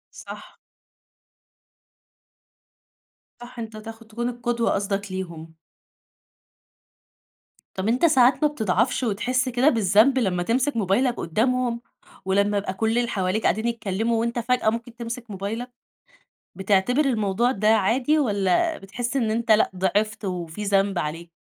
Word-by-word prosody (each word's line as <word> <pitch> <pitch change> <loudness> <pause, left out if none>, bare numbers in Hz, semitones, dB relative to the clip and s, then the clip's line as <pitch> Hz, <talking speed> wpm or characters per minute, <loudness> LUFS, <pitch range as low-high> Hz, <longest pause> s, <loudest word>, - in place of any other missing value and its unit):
صح. - - -11 2.8
صح 240 0 -10
أنتَ 220 -1 -7
تاخ 225 +1 -9
تكون 230 +2 -4
القدوة 240 -1 -1
قصدك 200 0 -2
ليهم. 170 -4 -6 2.2
طب 190 +2 -2
أنت 250 +8 +2
ساعات 265 -1 +4
ما - - +6
بتضعفش 230 0 0
وتحس 255 +4 0
كده 250 +4 +3
بالذنب 225 - +4
لمّا 180 -6 0
تمسك 255 +4 0
موبايلك 225 +6 +2
قدّامهم؟ 235 +6 0 0.4
ولمّا 200 +2 +2
يبقى 195 -1 -2
كلّ 220 +3 0
اللي 240 -1 +1
حواليك 190 +2 -1
قاعدين 220 +3 +1
يتكلّموا 225 0 -1
وأنت 235 +1 -1
فجأة 240 -1 +1
ممكن 230 +1 -5
تمسك 235 -1 -7
موبايلك؟ 210 +6 -4 0.9
بتعتبر 200 +9 +2
الموضوع 230 -1 +1
ده 210 -2 -1
عادي، 235 +8 +3
والَّا 210 - +1
بتحس 240 +7 -5
إن 225 -5 +1
أنت 230 0 0
لأ 215 -2 +4
ِضِعفت 205 +4 -1
وفي 180 +1 -4
ذنب 195 -1 +1
عليك؟ 165 +3 -5
225 Hz, 125 wpm, -24 LUFS, 195-245 Hz, 2.8 s, ما